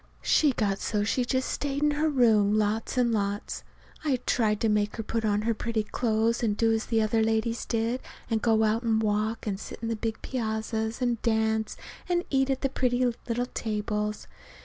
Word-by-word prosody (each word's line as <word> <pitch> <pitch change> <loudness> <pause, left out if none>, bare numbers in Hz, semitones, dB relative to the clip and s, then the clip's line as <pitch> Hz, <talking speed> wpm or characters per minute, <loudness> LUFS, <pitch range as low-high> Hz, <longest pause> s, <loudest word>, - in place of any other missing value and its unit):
She 300 -3 +4
got 200 -4 0
so 210 -2 0
she 245 +4 +1
just 260 +1 0
stayed 285 0 -2
in 300 - +4
her 300 +2 +1
room 220 -6 +4
lots 215 +4 0
and 245 -2 +3
lots. 205 -1 -2 0.4
I 290 -4 +2
tried 210 -3 +2
to 225 - +3
make 210 -1 +1
her 225 - -4
put 225 +1 -2
on 210 -1 +1
her 230 +1 +1
pretty 225 0 -2
clothes, 225 +1 0
and 210 -3 0
do 225 -1 +3
as 220 0 -1
the 225 -2 +2
other 220 +1 +2
ladies 225 +1 0
did, 230 +2 -1 0.3
and 225 -2 0
go 220 -1 +3
out 220 +1 +2
and 225 -2 +2
walk 215 +1 0
and 200 -3 -2
sit - - -8
on 225 - -1
the 230 - 0
big 225 0 -3
piazzas, 220 -1 -2
and 240 -2 0
dance, 220 -1 0 0.3
and 350 0 +1
eat 270 -1 +2
at 265 -1 0
the 275 - +1
pretty 250 -1 +1
little 240 0 -2
tables. 210 -2 -3
225 Hz, 200 wpm, -27 LUFS, 215-245 Hz, 0.4 s, She